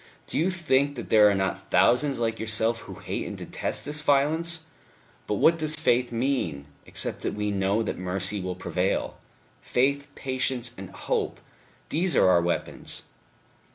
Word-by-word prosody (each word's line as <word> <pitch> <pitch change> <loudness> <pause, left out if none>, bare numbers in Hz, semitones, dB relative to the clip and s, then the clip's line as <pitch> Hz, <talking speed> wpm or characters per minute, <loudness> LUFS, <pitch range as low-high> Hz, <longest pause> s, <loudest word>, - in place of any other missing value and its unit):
Do - - -7
you 170 +4 +2
think 145 -6 +1
that 120 - -7
there 105 -1 +7
are 100 - +2
not 95 0 -2
thousands 135 +1 +3
like 115 -1 -1
yourself 110 +1 +1
who - - -10
hate - - -4
and - - -6
detest - - -3
this 150 +1 +1
violence?... 160 +4 +1 0.7
But 105 - 0
what 165 +10 +4
does 155 0 +4
faith 125 -6 +1
mean, 115 - -1 0.2
except - - -2
that - - -2
we 105 0 -1
know 100 +3 +1
that 110 - -4
mercy 95 +2 -2
will 90 0 -3
prevail? - - -2 0.4
Faith, 140 +3 +1
patience 130 -2 -1
and 95 -1 -8
hope - - -2 0.5
these 175 +3 +1
are 95 - +5
our 85 -1 +5
weapons." 85 0 -3
120 Hz, 160 wpm, -26 LUFS, 100-145 Hz, 0.7 s, there